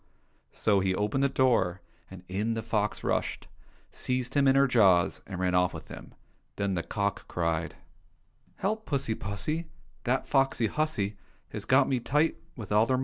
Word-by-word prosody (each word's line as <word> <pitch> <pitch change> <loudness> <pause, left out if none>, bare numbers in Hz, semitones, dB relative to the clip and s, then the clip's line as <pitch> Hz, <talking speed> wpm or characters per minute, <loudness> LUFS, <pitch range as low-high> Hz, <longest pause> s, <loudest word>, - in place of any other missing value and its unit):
" - - -41
so 105 -3 +2
he 95 -1 +1
opened 105 +7 0
the 140 - +3
door, 120 -10 +2 0.3
and 95 -1 -11
in 105 +5 -1
the 115 - -3
fox 105 -2 -1
rushed, - - -1 0.5
seized 125 0 -2
him 140 -1 +3
in 135 - +5
her 135 0 +6
jaws, 95 -8 +4
and 95 -2 -6
ran 90 -1 +1
off 90 0 +2
with - - -9
him. - - -10 0.4
Then 100 -1 -1
the 85 - 0
cock 100 +4 -2
cried: 85 -1 -1 0.4
" - - -38
Help 220 +2 -1
I - - -14
pussy 135 -6 0
pussy! 110 - -3 0.4
That 130 +2 0
foxy 135 -4 +2
hussy 110 -7 -1 0.3
Has - - -6
got 130 +1 +4
me 130 -2 +1
tight 150 +6 +1 0.2
With 110 -6 -8
all 105 +2 +4
her 130 - +2
110 Hz, 185 wpm, -29 LUFS, 95-135 Hz, 0.5 s, her